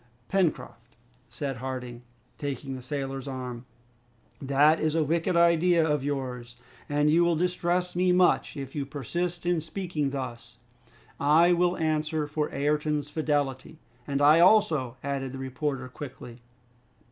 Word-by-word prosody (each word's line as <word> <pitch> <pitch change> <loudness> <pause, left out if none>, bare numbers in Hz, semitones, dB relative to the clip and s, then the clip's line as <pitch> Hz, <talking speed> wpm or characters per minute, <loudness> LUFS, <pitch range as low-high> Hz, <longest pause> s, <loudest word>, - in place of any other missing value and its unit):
"Pencroft," 155 -10 -1 0.3
said 140 -3 -4
Harding, 125 -1 -6 0.4
taking 140 -1 -4
the 130 - -8
sailor's 135 0 -4
arm, 125 -2 -6 0.8
"that 145 +3 +4
is 155 0 0
a 160 - +3
wicked 165 +3 0
idea 170 0 +4
of 150 -3 0
yours, 125 -4 -4 0.3
and 145 +1 +2
you 170 +2 +4
will 170 -1 +2
distress 180 +1 -1
me 180 +1 +3
much 180 -3 +2
if 135 -1 -6
you 145 - -2
persist 170 +6 -4
in 175 -2 +1
speaking 160 -3 -3
thus. 120 -3 -6 0.6
I 160 +5 +5
will 175 +1 +2
answer 155 -1 0
for 150 +1 -2
Ayrton's 150 +1 -1
fidelity." 145 -2 -1 0.3
"And 140 0 0
I 150 +3 +7
also," 155 - +4
added 135 -2 -3
the - - -6
reporter 130 0 -3
quickly. 130 -2 -10
145 Hz, 135 wpm, -27 LUFS, 135-165 Hz, 0.8 s, I